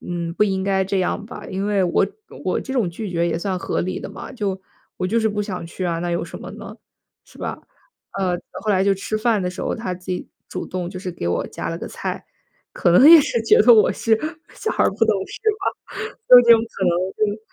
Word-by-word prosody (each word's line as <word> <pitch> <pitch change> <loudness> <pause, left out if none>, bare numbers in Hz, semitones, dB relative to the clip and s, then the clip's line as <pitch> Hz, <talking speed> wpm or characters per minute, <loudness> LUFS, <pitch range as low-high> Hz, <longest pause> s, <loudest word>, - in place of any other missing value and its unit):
嗯， 170 -1 -4
不 210 - +3
应 190 -2 -1
该 190 -1 +1
这 195 0 -1
样 195 +3 -1
吧。 230 - -9
因 195 +2 -3
为 200 -2 +2
我 180 +2 +2 0.4
我 - - 0
这 265 - -6
种 215 -9 +1
拒 200 +3 -6
绝 170 0 0
也 165 -1 -1
算 185 +1 -2
合 - - -2
理 185 - -3
的 - - -6
嘛， - - -9
就 200 -6 -3 0.4
我 185 - -1
就 225 +5 +1
是 220 -1 +2
不 210 0 -2
想 185 -5 -5
去 180 +2 -6
啊， 170 -1 -1
那 175 0 -2
有 170 0 -1
什 170 - -9
么 - - -9
呢？ - - -9 0.5
是 - - -19
吧？ - - -4 0.6
呃， 180 -2 +1 0.3
后 215 - 0
来 190 -1 +3
就 200 - +4
吃 200 +3 -3
饭 215 -1 +1
的 180 - -1
时 180 - -6
候， - - -1
他 220 -5 -4
自 180 0 -15
己 180 -1 -4 0.2
主 - - -5
动 180 -1 -4
就 185 - -7
是 185 -1 -4
给 165 - -5
我 85 - -1
夹 - - -5
了 - - -4
个 - - -6
菜。 - - -5 0.5
可 175 - +2
能 250 +11 +7
也 330 -1 +11
是 235 -4 -1
觉 225 - +5
得 235 +2 +8
我 215 - +5
是 220 -1 +1 0.4
小 445 - -3
孩 - - +1
儿 - - +3
不 195 - -10
懂 220 - +2
事 - - -10 0.2
吧， - - -5 0.3
就 250 - +11
是 245 - +9
这 235 -1 +7
种 225 - +6
可 190 - -2
能， 175 -1 +3 0.4
嗯， 210 - -7
190 Hz, 275 characters per minute, -21 LUFS, 180-215 Hz, 0.6 s, 也